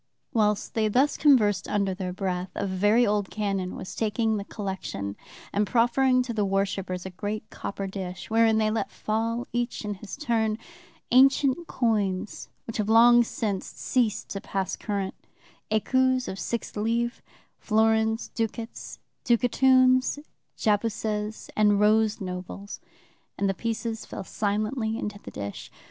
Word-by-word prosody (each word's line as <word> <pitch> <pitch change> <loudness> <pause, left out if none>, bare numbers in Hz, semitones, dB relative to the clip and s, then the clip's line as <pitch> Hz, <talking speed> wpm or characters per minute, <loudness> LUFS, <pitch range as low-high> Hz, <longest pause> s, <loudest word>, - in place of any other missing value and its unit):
"Whilst 210 -2 +1
they 220 -1 +2
thus 260 +7 +3
conversed 215 - +4
under 200 -2 0
their 185 -1 -4
breath, 185 -1 -2
a - - -1
very 205 +5 +3
old 205 -2 0
canon 195 -3 -2
was 185 - -7
taking 220 0 0
the 200 - -3
collection 190 - -5 0.4
and 205 +1 +1
proffering 255 +2 +3
to 245 -1 -4
the 215 -2 0
worshipers 195 -2 -1
a 190 - -5
great 210 +4 -4
copper 200 0 -5
dish, 190 -1 -6
wherein 225 0 +4
they 215 -1 +2
let 220 - -1
fall, 230 +3 -2
each 240 -2 -2
in 210 - -2
his 200 +1 -9
turn, 225 -6 0 0.5
ancient 270 +5 +4
coins 210 -5 -1 0.2
which 225 - -5
have 210 -1 -1
long 240 +2 +7
since 210 -4 -3
ceased 235 -5 -1
to 195 - -4
pass 195 -1 -2
current: 200 -3 -3 0.6
écus 260 +4 +2
of 190 - -5
six 230 +6 -3
livres, 235 +3 -1 0.4
florins, 220 0 +2
ducats 225 0 -4 0.3
and 235 -1 +5
ducatoons, 255 +1 +4 0.4
jacobuses 215 0 -1
and 210 -1 +4
rose 215 +1 +3
nobles, 185 +1 -6 0.6
and 200 - +1
the 195 - +1
pieces 225 +1 -3
fell - - -6
silently 215 +3 -1
into 210 -2 -4
the - - -10
dish. 100 0 -6
215 Hz, 145 wpm, -26 LUFS, 200-235 Hz, 0.6 s, long